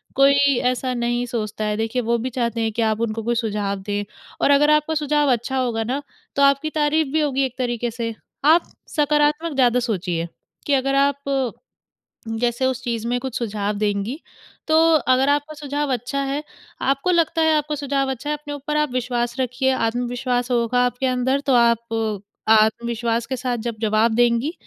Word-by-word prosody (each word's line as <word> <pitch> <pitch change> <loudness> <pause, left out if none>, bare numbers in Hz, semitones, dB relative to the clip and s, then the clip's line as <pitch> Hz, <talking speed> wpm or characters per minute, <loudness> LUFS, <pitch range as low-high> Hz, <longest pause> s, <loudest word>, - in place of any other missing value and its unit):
कोई 280 -1 +4 0.2
ऐसा 255 +1 -3
नहीं 240 0 -1
सोचता 215 -3 -3
है 210 0 -1
देखिए 225 +3 -1
वो 235 0 +1
भी 240 +3 -3
चाहते 235 -2 -2
हैं 220 0 0
कि 230 - -2
आप 220 0 +1
उनको 225 -1 -2
कोई 240 +1 0
सुझाव 210 -3 -2
दें 205 +1 -2 0.4
और - - +4
अगर 290 +1 +5
आपका 300 +1 +2
सुझाव 295 -2 +2
अच्छा 245 +2 -1
होगा 235 -3 0
ना 260 +5 -2 0.3
तो 280 - +1
आपकी 280 +2 +3
तारीफ़ 300 0 +2
भी 315 - +2
होगी 275 -2 +1
एक 260 0 -7
तरीक़े 240 -2 -2
से। 230 0 -4 0.3
आप 330 +3 +4 0.3
सकारात्मक 300 +2 +2
ज़्यादा 250 -2 +3
सोचिए 180 -8 -2 0.4
कि 285 - +2
अगर 275 +1 +1
आप 280 0 +3 1.2
जैसे 240 +1 0
उस 260 -1 -2
चीज़ 230 -1 -2
में 245 0 0
कुछ 265 -2 -5
सुझाव 210 -3 -2
देंगी, 210 +6 -1 0.5
तो 315 - +4 0.3
अगर 255 +2 +4
आपका 290 +2 0
सुझाव 290 -1 -2
अच्छा 255 +3 -2
है, 275 +2 -2 0.4
आपको 275 +6 +1
लगता 330 -1 +2
है 320 0 +4
आपका 300 0 -1
सुझाव 275 -1 -1
अच्छा 265 +3 -4
है, 300 - 0
अपने 290 0 -7
ऊपर 290 +1 -3
आप 300 -2 +1
विश्वास 240 -1 -1
रखिए। 260 +1 0
आत्मविश्वास 245 +1 -1
होगा 240 0 +1
आपके 245 +2 -2
अंदर 255 +2 +1
तो 270 - +3
आप 225 -3 +1 0.3
आत्मविश्वास 230 +1 +2
के 260 - -3
साथ 250 -1 -2
जब 235 -2 -3
जवाब 220 +1 +2
देंगी 240 +5 +2
250 Hz, 180 wpm, -22 LUFS, 230-280 Hz, 1.2 s, अगर